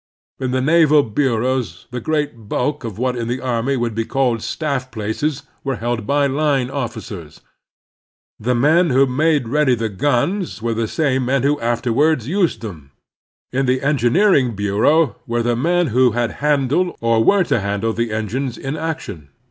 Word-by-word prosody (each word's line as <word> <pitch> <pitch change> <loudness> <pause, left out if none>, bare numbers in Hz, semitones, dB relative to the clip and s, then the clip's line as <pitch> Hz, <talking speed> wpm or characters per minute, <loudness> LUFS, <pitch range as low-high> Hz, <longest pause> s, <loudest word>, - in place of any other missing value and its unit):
In 130 -1 -2
the 130 +1 0
naval 155 0 +4
bureaus 120 - -1
the 125 - -3
great 145 -6 -3
bulk 145 +3 -1
of 110 -5 -6
what 125 +1 -1
in 115 -1 -3
the 125 +2 -2
army 130 +2 -1
would 120 -2 -1
be 115 +1 -1
called 125 -2 0
staff 140 -3 -3
places 115 +6 -3 0.2
are 135 -2 -1
held 120 -2 -3
by 145 0 +2
line 140 -2 0
officers. 105 - -6 1.0
The 125 +3 0
men 160 +8 +3
who 135 +1 +4
made 145 0 +1
ready 140 0 +2
the 115 -1 -2
guns 145 - -1
were 115 +1 -1
the 115 0 -1
same 135 -2 0
men 135 +1 +1
who 145 +1 +2
after 120 0 -1
ward 150 0 +2
used 175 - 0
them. 85 -12 -8 0.6
In 135 +1 0
the 130 +1 +1
Engineering 140 - +3
Btu 100 +1 0
eau 155 -3 +3
were 120 0 0
the 120 0 +1
men 170 +5 +1
who 125 -2 +4
had 120 0 0
handled 150 +4 +1
or 115 -1 +2
were 200 - +4
to 140 - 0
handle 100 +3 -1
the 115 0 -2
engines 115 +4 -3
in 135 +2 -4
action. 150 - -5
130 Hz, 175 wpm, -19 LUFS, 115-145 Hz, 1.0 s, naval